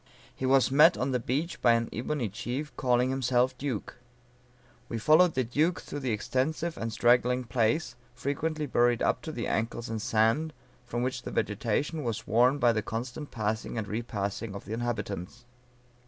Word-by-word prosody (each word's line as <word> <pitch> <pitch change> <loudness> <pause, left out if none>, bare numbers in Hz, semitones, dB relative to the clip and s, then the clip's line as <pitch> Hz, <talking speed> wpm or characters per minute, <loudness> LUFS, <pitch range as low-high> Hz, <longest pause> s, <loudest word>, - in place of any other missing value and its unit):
He 130 - -2
was 135 -1 +4
met 155 +5 +6
on 130 +2 -1
the 125 - +1
beach 145 +9 -2
by 120 - +5
an 115 0 +1
ebony 125 +1 -2
chief 120 +8 -5
calling 125 0 +2
himself 130 -1 +1
duke. 130 -7 -4 0.9
"We 115 - -3
followed 155 +9 +5
the 130 - +2
duke 150 +9 +1
through 145 - -6
the 130 -3 -3
extensive 150 +10 -1
and 115 0 -4
straggling 125 +2 +3
place, 120 +4 0 0.2
frequently 150 +4 -2
buried 120 -3 +2
up - - +1
to 160 - -6
the 120 -6 -4
ankles 115 +1 -2
in 115 -1 -3
sand, 115 +9 +1 0.3
from 120 0 -2
which 125 0 -2
the - - -6
vegetation 125 +9 -1
was 115 -4 -3
worn 125 +5 +4
by 120 -4 +4
the 110 - 0
constant 125 +7 -5
passing 110 0 -3
and 105 -2 -3
repassing 105 -1 -3
of 100 - -8
the 110 - -5
inhabitants. 115 -2 -4
125 Hz, 170 wpm, -29 LUFS, 115-140 Hz, 0.9 s, met